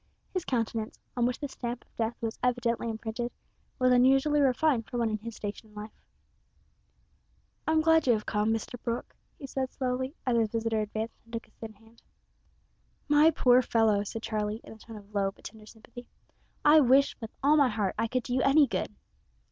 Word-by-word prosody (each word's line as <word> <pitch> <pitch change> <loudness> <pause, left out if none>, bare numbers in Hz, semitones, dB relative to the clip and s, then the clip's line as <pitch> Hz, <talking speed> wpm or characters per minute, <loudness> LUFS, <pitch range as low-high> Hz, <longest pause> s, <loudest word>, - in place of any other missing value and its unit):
His 370 -3 -2
countenance, 225 -3 -2 0.2
on 240 -1 +2
which 250 - -3
the 290 - -3
stamp 245 -2 -6
of - - -37
death 225 +1 -1
was 225 -1 -4
evidently 235 -2 0
imprinted, 225 +2 -4 0.5
was 255 0 +3
unusually 270 +4 +4
refined 265 -2 +2
for 245 - -4
one 230 -2 +1
in 215 - -2
his 230 +1 -8
station 210 +1 -7
in 210 - -21
life. 210 +1 -8 1.7
"I'm 315 0 +3
glad 320 -2 +4
you 245 - +6
have 215 -1 -2
come, 210 +1 0
Mr 225 +2 -4
Brooke," 235 0 -4 0.2
he 280 - -8
said 265 -1 -3
slowly, 260 +2 -3
as 250 -2 +1
his 225 -2 +2
visitor 225 0 -1
advanced 215 +2 -5
and 230 - -21
took 230 - -4
his 215 - -29
thin 220 -1 -8
hand. 225 +2 -23 1.1
"My 295 +2 +6
poor 255 -5 +4
fellow," 220 -4 +2
said 225 +2 -6
Charlie, 215 0 -2
in - - -11
a 220 - -16
tone 225 +1 -11
of 205 0 -15
low 200 -1 +1
but 195 - -17
tender 215 -1 -11
sympathy, 235 +2 -13 0.6
"I 300 +1 +8
wish 275 0 +4
with 225 - -5
all 290 +2 +5
my 285 -4 +4
heart 210 -4 -1
I 230 - +1
could 255 +2 -1
do 245 - -4
you 260 - +2
any 285 +2 +5
good." - - -3
235 Hz, 200 wpm, -29 LUFS, 220-260 Hz, 1.7 s, I